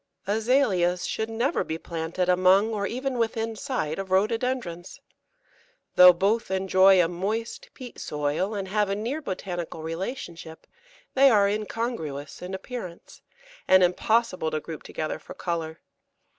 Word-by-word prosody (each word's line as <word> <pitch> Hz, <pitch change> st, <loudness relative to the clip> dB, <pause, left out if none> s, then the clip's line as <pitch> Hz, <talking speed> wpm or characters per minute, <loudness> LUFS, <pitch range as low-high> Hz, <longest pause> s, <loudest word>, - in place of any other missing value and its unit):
Azaleas 205 Hz, -5 st, +2 dB
should 220 Hz, 0 st, -2 dB
never 235 Hz, +8 st, 0 dB
be 160 Hz, -, -4 dB
planted 165 Hz, +2 st, -3 dB
among 185 Hz, +4 st, +4 dB
or 200 Hz, -1 st, -1 dB
even 255 Hz, +1 st, -3 dB
within 225 Hz, 0 st, -1 dB
sight 195 Hz, -, -3 dB
of 195 Hz, -1 st, -5 dB
Rhododendrons. 210 Hz, -2 st, -1 dB, 0.9 s
Though 180 Hz, 0 st, +9 dB
both 200 Hz, +6 st, 0 dB
enjoy 190 Hz, 0 st, +4 dB
a -, -, +1 dB
moist 205 Hz, +7 st, -4 dB
peat 250 Hz, -2 st, -10 dB
soil, 150 Hz, +8 st, -2 dB
and 195 Hz, -1 st, -3 dB
have 210 Hz, 0 st, +1 dB
a 195 Hz, -, 0 dB
near 240 Hz, +9 st, -3 dB
botanical 175 Hz, -, -5 dB
relationship, 165 Hz, -2 st, -6 dB, 0.5 s
they 275 Hz, +1 st, +6 dB
are 205 Hz, -4 st, +4 dB
incongruous 200 Hz, -, -4 dB
in 180 Hz, +1 st, -5 dB
appearance, 190 Hz, -4 st, -8 dB, 0.5 s
and 185 Hz, 0 st, +6 dB
impossible 185 Hz, -1 st, +1 dB
to 155 Hz, 0 st, -2 dB
group 160 Hz, 0 st, -8 dB
together 155 Hz, -, -4 dB
for -, -, -11 dB
colour. 165 Hz, -2 st, -4 dB
190 Hz, 135 wpm, -26 LUFS, 175-225 Hz, 0.9 s, Though